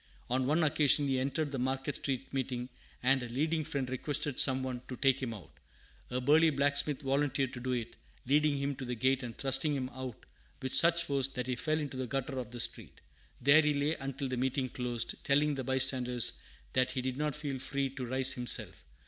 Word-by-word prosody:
On 130 0 +1
one 160 +4 +3
occasion 145 -1 +3
he 135 -1 +1
entered 140 +3 -1
the 135 - -3
Market 135 +3 -1
Street 135 -2 -4
Meeting, 125 -2 -2 0.3
and 135 +1 +4
a 120 - -5
leading 155 +6 0
Friend 140 -3 -3
requested 145 +2 -2
some 130 -1 +4
one 125 -2 -4
to 130 - -5
take 135 +1 +2
him 125 -3 -2
out. 100 -7 -10 0.6
A 125 - -1
burly 155 +5 +5
blacksmith 140 0 +2
volunteered 135 -1 0
to 125 - -6
do 130 +1 -2
it, 120 -2 -4 0.3
leading 145 +2 +3
him 140 +1 -1
to 130 - -5
the 125 0 -3
gate 130 +3 +2
and 120 -2 -7
thrusting 135 +2 +1
him 130 -2 -2
out 130 -2 -7 0.3
with 130 -1 -3
such 170 0 +7
force 140 -3 +1
that 125 -2 -4
he 125 0 -1
fell 155 +5 0
into 145 -3 -4
the 130 -1 -3
gutter 135 0 -2
of 120 -4 -5
the 120 +1 -8
street. - - -4 0.4
There 140 +5 +7
he 150 -1 +1
lay 145 +2 +1
until 135 -1 -4
the 130 -1 -3
meeting 130 +1 0
closed, 120 -1 -3
telling 145 +2 +3
the 135 -2 -3
bystanders 125 -2 +1 0.4
that 130 0 +2
he 130 - -1
did 130 0 -2
not 150 -1 -1
feel 145 -3 -4
free 135 +1 -2
to 130 -1 -6
rise 130 +1 +2
himself. 125 -2 -1
135 Hz, 210 wpm, -32 LUFS, 125-145 Hz, 0.6 s, such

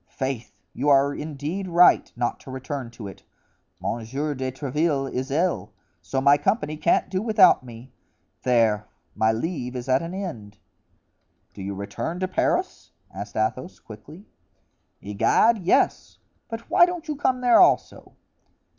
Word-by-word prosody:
Faith, 130 -3 -5
you 145 +4 -1
are 140 0 +4
indeed 155 +6 -5
right 175 0 +5
not 120 0 -2
to - - -13
return 130 -1 -5
to 115 -3 -9
it. 95 - -11 0.6
Monsieur 135 +7 -3
de 130 -1 -3
Tréville 140 +1 -1
is 130 +2 -3
ill, 170 +6 0 0.3
so 135 - -2
my 140 +2 +5
company 155 -1 0
can't 165 +2 +1
do 185 0 -2
without 205 - +5
me; 120 +1 -12 0.5
there! 115 -4 +2 0.3
my 110 0 +2
leave 125 +1 -4
is 125 +1 -5
at 130 0 +2
an 170 +2 -6
end!" 115 - -7 1.0
"Do 100 - -10
you 100 +1 -5
return 130 - -5
to 185 - -1
Paris?" 185 - -1 0.2
asked 100 +2 -8
Athos, 110 +10 -2
quickly. 140 - -13 0.8
"Egad! 105 - +2
yes; 180 -1 +1 0.3
but 225 0 -7
why 350 -1 +5
don't 350 -2 -6
you 305 - -2
come 260 -2 0
there 245 -1 +5
also?" 360 0 +2
140 Hz, 145 wpm, -24 LUFS, 120-180 Hz, 1.0 s, right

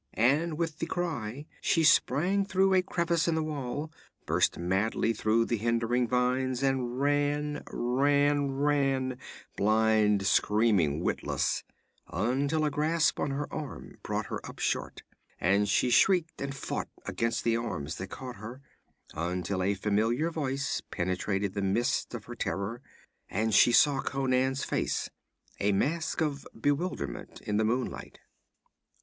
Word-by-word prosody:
_' - - -50
And 150 +8 +2
with 165 -2 -2
the 165 - -2
cry 145 -7 -3 0.2
she 165 - +2
sprang 180 +5 +3
through 195 0 +2
a 185 - +5
crevice 170 -2 0
in 165 - +2
the 160 - 0
wall, 145 0 -4 0.3
burst - - +2
madly 95 +6 0
through 110 +2 +2
the 120 - -1
hindering 115 +2 +1
vines, 125 +1 0
and 130 -2 0
ran, 145 +1 0
ran, 145 +3 +2
ran 135 -2 0 0.4
blind, 110 -1 +3
screaming, 100 -7 +3
witless - - -1 0.4
until 140 +7 0
a 150 - 0
grasp 155 +2 +1
on - - 0
her 140 +1 -2
arm 150 -3 -7
brought - - -2
her - - -5
up - - -9
short - - -2 0.4
and 100 +3 +2
she 125 +4 +2
shrieked 175 +2 +3
and 140 -1 -3
fought - - -4 0.2
against 115 0 -1
the 115 -1 +2
arms 80 -10 -3
that 95 - -5
caught 125 -1 -7
her, 115 +6 -8 0.5
until 90 +3 -2
a 100 +2 +1
familiar 110 - +1
voice 140 -3 -2
penetrated 95 +2 -1
the 100 - -2
mists 120 +6 0
of 110 - -7
her 120 - -7
terror, 115 0 -3 0.5
and 110 +3 0
she 120 - +6
saw 140 +2 +5
Conan's 130 0 0
face, - - -1 0.5
a 100 - +2
mask 155 +14 0
of 145 -3 -2
bewilderment 145 +9 -2
in 105 0 -1
the 110 - +2
moonlight. 125 +3 -2
130 Hz, 145 wpm, -29 LUFS, 110-145 Hz, 0.5 s, she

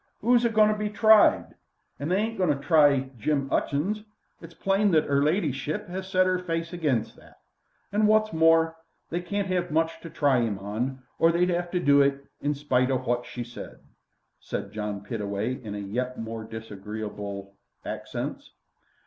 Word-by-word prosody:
'Oo's 240 +1 +4
a 235 - +3
goin' 215 -1 +5
to - - +2
be 210 0 -2
tried? 215 +1 +5 0.5
They 155 +6 0
ain't 220 +3 0
agoin' 180 - +2
to 145 - +3
try 145 -5 +4
Jim 140 +3 0
'Utchings. 195 +10 0 0.4
It's 165 0 -12
plain 195 +4 +2
that 155 - +4
'er 140 0 +2
ladyship 150 -3 -1
'as 190 +1 -5
set 185 -1 +3
'er 185 0 +1
face 165 -1 -3
against 145 -10 -1
that. - - -19 0.5
And, 210 +1 +3
wot's 215 -1 +3
more, 165 0 +4 0.3
they 175 +2 -1
can't 195 +1 -2
'ave 180 -1 0
much 160 +1 0
to 165 - -8
try 140 -5 +2
'im 110 -4 -1
on, 120 +7 -4 0.2
or 165 - +5
they'd 180 +2 +2
'ave 175 0 -1
to 180 - +2
do 140 -3 +5
it, 140 0 +1 0.2
in 145 +1 0
spite 130 -3 +1
o' 135 - +2
wot 120 -1 -2
she 120 - -5
said," 120 0 -10 0.6
said - - -5
John 105 -1 -4
Pittaway 105 +3 -3
in 105 -2 -6 0.2
yet 125 +1 -2
more 115 0 -5
disagreeable 105 -2 -7 0.3
accents. - - -5
150 Hz, 175 wpm, -26 LUFS, 120-180 Hz, 0.6 s, goin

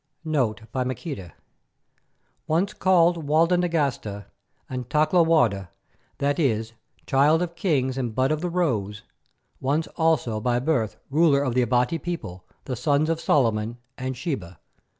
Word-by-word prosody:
NOTE 125 -9 0
BY 130 - -1
MAQUEDA 125 - -5 1.1
Once 180 +6 +1
called 175 -4 +3
Walda 165 +4 +4
Nagasta 140 - -1 0.4
and 125 -1 -5
Takla 155 +3 +3
Warda, 115 - +2 0.5
that 145 +3 0
is, 115 -6 0 0.3
Child 150 +5 +3
of 170 -1 -5
Kings 135 -8 0
and 120 -4 -3
Bud 130 +2 +2
of 155 0 -1
the 180 - -1
Rose, 110 - -1 0.6
once 145 +5 0
also 155 -10 +1
by 120 +1 +1
birth 125 -5 0
Ruler 145 -2 +4
of 130 -4 -1
the 125 - +3
Abati 125 +6 +1
people, 95 - -6 0.2
the 130 - -3
Sons 145 +6 +1
of 165 0 -2
Solomon 115 -4 +1 0.2
and 130 0 -4
Sheba. 105 - -5
135 Hz, 140 wpm, -24 LUFS, 120-165 Hz, 1.1 s, Walda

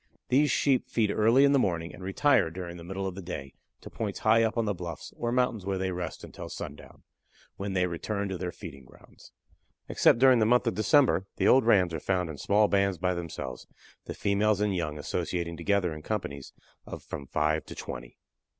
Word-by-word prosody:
These 145 +4 +4
Sheep 135 -3 +1
feed 110 -3 +1
early 115 +6 +4
in 140 - +4
the 140 - +4
morning, 85 -6 -1
and - - -12
retire 110 - +2
during 85 0 -7
the 85 - -10
middle 95 +2 -4
of 95 - -3
the 95 - -8
day 70 -7 -7 0.3
to - - -10
points 105 -3 -4
high 110 +1 +4
up 115 +1 0
on 115 - +1
the 105 - 0
bluffs 85 -4 -7
or 120 - -2
mountains 125 -4 0
where 95 0 -2
they 95 0 -1
rest 90 -2 -5
until - - -9
sundown, - - -9 0.5
when 100 0 -4
they 90 -1 +2
return 100 +4 -3
to 95 - -3
their 90 -1 -3
feeding 70 -5 -10
grounds. 65 - -18 0.6
Except - - +4
during 130 -1 +6
the 110 - +3
month 125 +2 +3
of 115 - +1
December 110 - +3
the - - +1
old 130 -3 +5
rams 90 -6 +4
are 80 - -2
found 90 -1 -1
in 70 - -10
small 105 +1 +3
bands 100 -2 +1
by 90 +2 0
themselves, 85 -7 -6 0.4
the - - -6
females 100 0 +1
and 105 -2 +1
young 75 -4 -2
associating 85 +4 -3
together 90 0 0
in 75 - -8
companies 75 -8 -4 0.3
of - - -9
from 70 - -7
five 75 +2 0
to - - -8
twenty. - - -8
95 Hz, 210 wpm, -28 LUFS, 85-110 Hz, 0.6 s, during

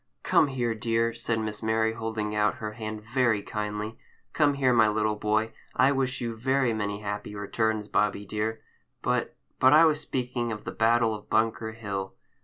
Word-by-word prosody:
"Come - - +4
here, 125 -4 -1
dear!" 115 0 0
said 115 -1 -1
Miss 110 -1 -4
Mary, 110 0 +1
holding 110 -2 -3
out 105 0 +2
her 110 -1 -5
hand 110 -1 -6
very 120 -6 +2
kindly. 105 +1 -4 0.3
"Come 145 -2 +3
here, 130 -2 +3
my 110 -2 +5
little 105 0 +1
boy. 110 +1 0 0.2
I 130 +2 +5
wish 135 -2 -1
you 115 -1 -3
very 130 +1 +1
many 105 -1 -3
happy 105 0 -5
returns, 105 +1 -1
Bobby 105 -1 0
dear! 110 +2 -3 0.4
but—but 130 +2 +1
I 160 +2 +8
was 155 -1 +2
speaking 125 -3 -2
of 105 -1 -5
the - - -5
battle 115 0 +3
of 105 -1 -9
Bunker 110 0 +1
Hill." 100 -4 -5
110 Hz, 175 wpm, -27 LUFS, 105-120 Hz, 0.4 s, I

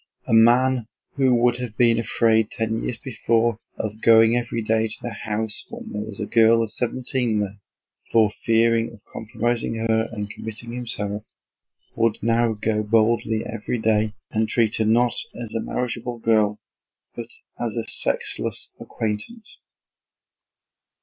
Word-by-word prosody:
A - - -2
man 120 +1 +4 0.3
who 130 -3 +3
would 120 0 +3
have 120 -4 -6
been 115 -2 +4
afraid 110 -1 +2
ten 110 0 -2
years 120 - -3
before 115 -2 0 0.2
of 110 +1 -5
going 115 0 +6
every 120 -1 -2
day 110 +1 +1
to - - -1
the 120 - -6
house 105 +1 0
when - - -9
there 105 - -3
was 105 -1 -4
a 105 - -2
girl 115 +1 +4
of 110 - -3
seventeen 125 -1 -1
there, 100 -1 -4 0.5
for 110 -3 +4
fear 115 0 +3 0.2
of 115 - -14
compromising 115 +1 -2
her 110 0 0
and 105 -3 -4
committing 110 +3 -7
himself, 105 -4 -3 0.7
would 115 -2 +1
now 115 0 +2
go 105 0 -1
boldly 110 +1 +1
every 115 +1 -3
day 110 -1 +1 0.2
and 110 0 0
treat 110 -1 +1
her 110 - +1
not 120 +2 +3 0.3
as 115 -2 -5
a 115 - -1
marriageable 125 -1 -3
girl 110 -2 +2 0.6
but - - -6 0.3
as - - -2
a - - -1
sexless - - -1
acquaintance. 115 - -5
115 Hz, 150 wpm, -23 LUFS, 110-120 Hz, 0.7 s, going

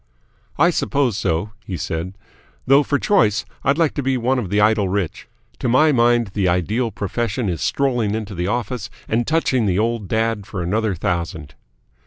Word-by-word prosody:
"I 170 +4 +4
suppose 140 - 0
so," 95 0 -1
he 95 - -5
said. 85 +5 -4 0.5
"Though 135 +2 +6
for 145 0 0
choice 110 - +2 0.2
I'd 140 - +2
like 165 -3 +2
to 145 - -2
be 135 -1 0
one 125 +2 +1
of 105 -7 -4
the 105 +2 +1
Idle 105 -2 +3
Rich. 95 -3 -3 0.3
To - - -1
my 150 +6 +5
mind 120 -4 +3
the 100 -3 +1
ideal 105 +7 0
profession 110 +3 -2
is 85 -6 -2
strolling 120 - 0
into 110 -2 -5
the 90 -1 -2
office 120 0 -2 0.2
and 115 +2 0
touching 135 -8 +1
the 90 -1 +1
old 115 -1 0
dad 110 -2 -1
for 95 -3 -4
another 105 +3 0
thousand." 85 -3 -3
110 Hz, 180 wpm, -20 LUFS, 95-125 Hz, 0.5 s, Though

